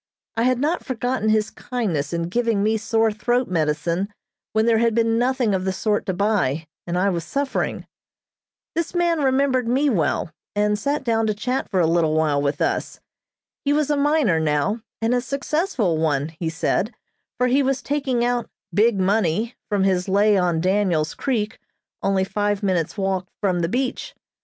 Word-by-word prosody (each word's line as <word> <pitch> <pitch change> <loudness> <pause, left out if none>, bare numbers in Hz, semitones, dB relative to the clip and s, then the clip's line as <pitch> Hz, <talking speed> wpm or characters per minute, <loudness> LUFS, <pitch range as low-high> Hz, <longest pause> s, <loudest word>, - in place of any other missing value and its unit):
I 230 +1 +1
had 255 -1 +3
not 305 +7 0
forgotten 245 -3 -1
his 215 0 +2
kindness 180 - -2
in 170 -1 -1
giving 220 +3 0
me 220 +1 +2
sore 225 +1 +1
throat 240 +4 0
medicine 170 +3 -1 0.4
when 220 0 +2
there 230 -1 +4
had 230 -1 +2
been 230 0 +2
nothing 250 -3 +1
of 185 -1 0
the 190 - 0
sort 210 +3 -1
to 190 - 0
buy, 180 -7 +1 0.2
and 175 +1 -1
I 195 +2 +2
was 170 -3 -2
suffering. 275 - -2 0.9
This 335 +1 -2
man 345 -2 +2
remembered 260 -2 +2
me 270 +4 +2
well, 165 -4 0 0.2
and 210 0 +1
sat 285 +5 -1
down 225 -3 +1
to 215 - 0
chat 250 +5 -2
for 190 - 0
a 170 - +4
little 160 -1 +2
while 150 -3 +2
with 140 +1 0
us. - - -2 0.6
He 285 - +2
was 300 0 +1
a - - +3
miner 285 - +2
now, 160 +8 0 0.2
and 230 +2 +2
a 245 - +2
successful 275 - -1
one, 150 -2 0
he 165 0 -4
said, 190 +7 -1 0.4
for 250 - +2
he 255 +3 +3
was 270 0 0
taking 270 -4 0
out 245 -1 -1 0.2
"big 215 0 +3
money" 205 +3 +1 0.2
from 205 -2 +1
his 185 -1 +1
lay 205 +2 +4
on 175 -4 +1
Daniels 185 -5 +1
Creek, 225 -6 -2 0.4
only 195 -1 +2
five 205 +1 -1
minutes' 180 -2 0
walk 190 -2 -1
from 185 -4 +1
the 165 -1 0
beach. 255 +4 -2
210 Hz, 180 wpm, -22 LUFS, 180-250 Hz, 0.9 s, there